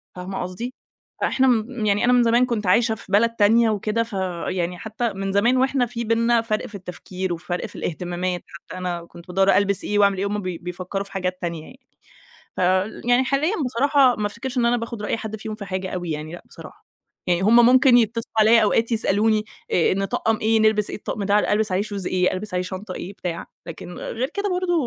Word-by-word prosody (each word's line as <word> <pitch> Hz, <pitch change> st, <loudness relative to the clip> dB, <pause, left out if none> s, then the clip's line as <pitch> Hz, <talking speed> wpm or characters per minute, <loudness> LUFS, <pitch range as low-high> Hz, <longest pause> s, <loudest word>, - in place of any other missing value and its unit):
فاهمة 185 Hz, +1 st, -5 dB
قصدي؟ 185 Hz, +8 st, -5 dB, 0.5 s
فإحنا 265 Hz, 0 st, +2 dB
م 230 Hz, -1 st, 0 dB
يعني 205 Hz, 0 st, +2 dB
أنا 250 Hz, -, +4 dB
من 245 Hz, -1 st, +5 dB
زمان 235 Hz, +2 st, +4 dB
كنت 225 Hz, -5 st, -2 dB
عايشة 220 Hz, +4 st, +3 dB
في -, -, -13 dB
بلد 220 Hz, +3 st, +4 dB
تانية 225 Hz, +2 st, +4 dB
وكده، 215 Hz, +2 st, 0 dB
فيعني 180 Hz, -4 st, -3 dB
حتى 220 Hz, +4 st, -3 dB
من 195 Hz, 0 st, -3 dB
زمان 230 Hz, +6 st, +3 dB
واحنا 265 Hz, -1 st, +2 dB
في 235 Hz, 0 st, -5 dB
بيننا 230 Hz, +1 st, +2 dB
فرْق 215 Hz, -2 st, -2 dB
في 210 Hz, -, -11 dB
التفكير 185 Hz, -1 st, -5 dB
وفرْق 175 Hz, +1 st, -4 dB
في -, -, -10 dB
الاهتمامات، 175 Hz, +1 st, -3 dB
حتى 170 Hz, +2 st, -11 dB
أنا 175 Hz, -2 st, -4 dB
كنت 170 Hz, 0 st, -15 dB
بادوّر 190 Hz, +2 st, +3 dB
ألبس 200 Hz, -1 st, +1 dB
إيه 205 Hz, 0 st, 0 dB
وأعمل 200 Hz, -1 st, +4 dB
إيه، 195 Hz, -, -1 dB
وهُم 205 Hz, +1 st, -2 dB
بي 185 Hz, -3 st, -4 dB
بيفكروا 180 Hz, +3 st, -5 dB
في 200 Hz, -, -12 dB
حاجات 185 Hz, -1 st, -3 dB
تانية 170 Hz, -3 st, -3 dB
يعني. 255 Hz, +9 st, -15 dB, 0.8 s
فال 185 Hz, +3 st, 0 dB
يعني 250 Hz, +2 st, +4 dB
حاليًا 285 Hz, +7 st, +1 dB
بصراحة 260 Hz, +1 st, +3 dB
ما 210 Hz, -, -1 dB
افتكرش 240 Hz, +5 st, -5 dB
إن 235 Hz, -, +3 dB
أنا 240 Hz, +1 st, +3 dB
باخد 230 Hz, -2 st, -5 dB
رأي 210 Hz, -, -1 dB
حد 220 Hz, -1 st, -6 dB
فيهم 215 Hz, 0 st, -6 dB
في 215 Hz, -1 st, -8 dB
حاجة 190 Hz, -1 st, -4 dB
أوي 175 Hz, -2 st, -4 dB
يعني، 155 Hz, +1 st, -4 dB
لأ 175 Hz, -, -9 dB
بصراحة، -, -, -13 dB, 0.4 s
يعني 175 Hz, -1 st, +2 dB
هُم 230 Hz, +4 st, +6 dB
ممكن 255 Hz, 0 st, +6 dB
يتصلوا 230 Hz, 0 st, -1 dB
عليَّ، 220 Hz, +1 st, +6 dB
أوقات 225 Hz, +2 st, +1 dB
يسألوني 215 Hz, 0 st, +2 dB, 0.3 s
آآ 175 Hz, -, +3 dB
نطقّم 215 Hz, +3 st, 0 dB
إيه؟ 220 Hz, 0 st, +2 dB
نلبس 215 Hz, -1 st, +2 dB
إيه؟ -, -, -4 dB
الطقم 205 Hz, 0 st, -4 dB
ده 205 Hz, +1 st, +2 dB
ألبس 210 Hz, -2 st, +1 dB
عليه 185 Hz, -, +1 dB
Shoes 205 Hz, -3 st, -5 dB
إيه؟ 180 Hz, 0 st, +1 dB
ألبس 195 Hz, +1 st, -5 dB
عليه 180 Hz, -, +1 dB
شنطة 185 Hz, +1 st, -6 dB
إيه؟ 185 Hz, +3 st, -6 dB
بتاع، 175 Hz, -4 st, -5 dB, 0.2 s
لكن 180 Hz, -, -8 dB
غير 255 Hz, +5 st, -3 dB
كده 405 Hz, 0 st, -1 dB
برضه، 360 Hz, -1 st, 0 dB
210 Hz, 210 wpm, -22 LUFS, 185-230 Hz, 0.8 s, هُم